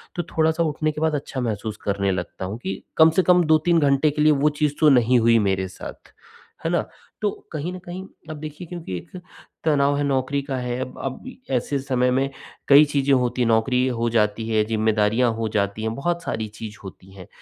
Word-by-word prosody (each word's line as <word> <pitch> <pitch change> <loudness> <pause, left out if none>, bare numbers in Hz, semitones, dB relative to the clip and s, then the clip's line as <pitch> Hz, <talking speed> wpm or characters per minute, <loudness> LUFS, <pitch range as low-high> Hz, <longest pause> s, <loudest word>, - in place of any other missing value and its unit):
तो 175 - -2
थोड़ा-सा 160 +1 +1
उठने 155 0 -1
के 150 - -7
बाद 160 -1 +1
अच्छा 135 -2 -4
महसूस 110 -2 -3
करने 100 -1 0
लगता 95 0 -4
हूँ 100 +4 -5
कि 95 0 -4 0.2
कम 160 0 +7
से - - +4
कम 180 -1 +5
2-3 160 +2 +3
घंटे 145 0 +3
के 150 +1 -2
लिए 155 0 +5
वो 145 +1 +3
चीज़ 150 -2 +2
तो 155 - +6
नहीं 125 -2 +4
हुई 115 0 +4
मेरे 95 -2 0
साथ, 95 - -11 0.5
है - - +1
ना। - - 0 0.3
तो 210 - +2 0.2
कहीं 155 +3 -4
न 185 - -7
कहीं 180 +2 -6 0.3
अब 155 - -6
देखिए 155 +3 -8
क्योंकि 165 - -6
एक 135 - -10 0.5
तनाव 145 -2 +2
है, 145 - 0
नौकरी 140 0 0
का 135 -1 -4
है, 125 0 -3
अब 130 0 -6 0.3
ऐसे 135 +2 0
समय 130 -2 +1
में 135 +2 +1 0.4
कई 145 +2 +8
चीज़ें 140 -1 +1
होती 125 -1 +1
हैं, 120 - +2
नौकरी 125 +3 +2
हो 120 -2 -1
जाती 110 -1 0
है, 110 -1 +2
ज़िम्मेदारियाँ 110 +2 +2
हो 115 0 -2
जाती 100 0 -1
हैं, 110 0 -1
बहुत 170 +5 -2
सारी 110 -1 -3
चीज़ 105 0 -9
होती 95 0 -12
हैं। 95 -2 -12
130 Hz, 210 wpm, -23 LUFS, 110-150 Hz, 0.5 s, कई